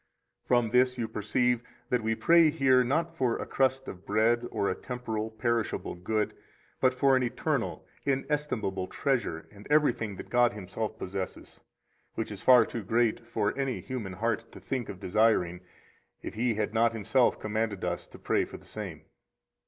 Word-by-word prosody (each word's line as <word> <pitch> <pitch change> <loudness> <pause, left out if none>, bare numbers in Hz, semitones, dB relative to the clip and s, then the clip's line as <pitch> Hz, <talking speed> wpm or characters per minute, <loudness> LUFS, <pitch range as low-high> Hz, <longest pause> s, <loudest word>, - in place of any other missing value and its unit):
55 - - -39
From 120 -2 +3
this 125 +1 +3
you 115 -2 -1
perceive 120 +3 0 0.3
that 125 -1 +2
we 110 +1 0
pray 165 +5 +5
here 135 -4 +4
not 155 +7 0
for 125 -3 +1
a - - -4
crust 135 0 +1
of 90 0 -8
bread 115 +3 +2
or 100 - -1
a - - +1
temporal, 110 0 -4
perishable 115 0 -1
good, 105 +5 -1 0.5
but 130 - +4
for 135 +1 +3
an 130 - +3
eternal 120 -2 -2 0.2
inestimable 135 -9 -1
treasure 120 - -1
and 100 0 -13
everything 125 -9 +2
that - - -10
God 120 -2 +4
Himself 105 +2 -5
possesses; 95 -2 -6 0.5
which 110 - -3
is 100 - -7
far 125 -3 +7
too 115 - -5
great 115 +2 +1
for 105 -3 -1
any 135 -2 -1
human 115 -8 -5
heart 110 +3 -2
to - - -10
think 130 -4 -3
of 95 - -7
desiring 95 -3 +2 0.6
if - - -5
He 115 0 0
had 105 0 -1
not 115 0 +3
Himself 115 +3 +2
commanded 110 -2 -2
us 90 0 -3
to - - -13
pray - - +1
for - - -8
the - - -19
same. - - -7
115 Hz, 175 wpm, -29 LUFS, 105-125 Hz, 0.6 s, far